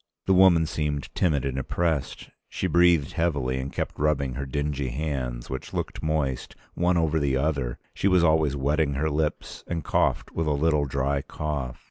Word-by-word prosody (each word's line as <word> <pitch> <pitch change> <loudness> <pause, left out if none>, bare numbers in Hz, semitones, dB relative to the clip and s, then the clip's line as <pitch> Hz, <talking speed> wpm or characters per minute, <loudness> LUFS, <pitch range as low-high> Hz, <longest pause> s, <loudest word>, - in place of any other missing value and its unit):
The 95 - +3
woman 90 -3 +6
seemed 75 -2 -3
timid 75 -7 +1
and 65 -1 -2
oppressed: 80 +1 -2 0.2
she - - -3
breathed 85 -4 +4
heavily 70 -6 0
and 65 +1 -4
kept - - -4
rubbing 70 -3 +1
her 70 +2 -4
dingy 70 0 -2
hands, 65 -3 -3
which 65 - -6
looked - - -3
moist, 75 -5 -1 0.2
one 90 0 +2
over 80 -1 +2
the 70 -2 +1
other; 70 -4 -1 0.2
she - - 0
was 90 -3 +4
always 80 -3 +3
wetting 70 +1 +1
her 75 +3 0
lips, 75 +1 -2
and 85 -2 -3
coughed - - 0
with 80 -1 -2
a 75 - +2
little 75 0 +2
dry 70 +1 -1
cough. 70 -4 -4
75 Hz, 175 wpm, -26 LUFS, 70-80 Hz, 0.2 s, woman